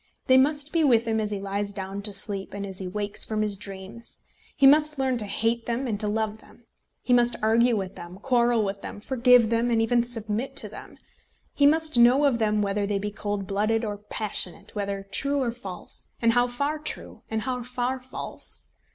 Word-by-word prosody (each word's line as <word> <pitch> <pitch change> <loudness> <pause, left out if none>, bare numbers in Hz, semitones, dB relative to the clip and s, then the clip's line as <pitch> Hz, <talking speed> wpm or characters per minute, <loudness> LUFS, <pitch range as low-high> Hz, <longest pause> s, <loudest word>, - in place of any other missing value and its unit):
They 260 - +6
must 290 +2 +1
be 330 -2 +3
with 235 -5 +4
him 220 -1 0
as 215 -1 -1
he 205 -1 -2
lies 200 +1 -3
down 195 0 -5
to 205 +1 -5
sleep, 195 0 -2
and 200 0 -4
as 190 -1 -7
he 190 - -5
wakes 205 +2 -3
from 215 -1 -1
his 210 -1 0
dreams. 195 +3 -9 0.3
He 275 - +4
must 300 +2 +6
learn 260 -2 0
to 210 - -2
hate 230 +3 0
them 240 +3 -1
and 215 -5 -2
to 210 - -1
love 220 0 -1
them. 235 - -19 0.4
He 250 - +2
must 240 -1 +4
argue 230 +1 +4
with 190 -1 -4
them, 175 +1 -9
quarrel 240 -1 +2
with 195 0 -3
them, - - -7
forgive 245 -1 +4
them, 230 +1 +2
and 230 -1 +2
even 235 +2 +3
submit 230 0 -2
to - - -4
them. - - -11 0.6
He 285 - +5
must 310 -3 +3
know 250 +5 +6
of 255 -4 +2
them 210 -1 +2
whether 200 0 -1
they 205 -1 0
be 205 +1 -3
cold 205 -1 -3
blooded 215 +4 0
or 205 -1 -3
passionate, 210 -3 -2
whether 200 -1 -3
true 280 +6 0
or 250 -3 0
false, 200 -6 -8
and 230 -1 +3
how 245 +1 +3
far 280 +5 -2
true, 305 - -6
and 220 -1 -2
how 250 -1 -2
far 250 +1 -2
false. 255 +1 -7
225 Hz, 210 wpm, -26 LUFS, 205-250 Hz, 0.6 s, They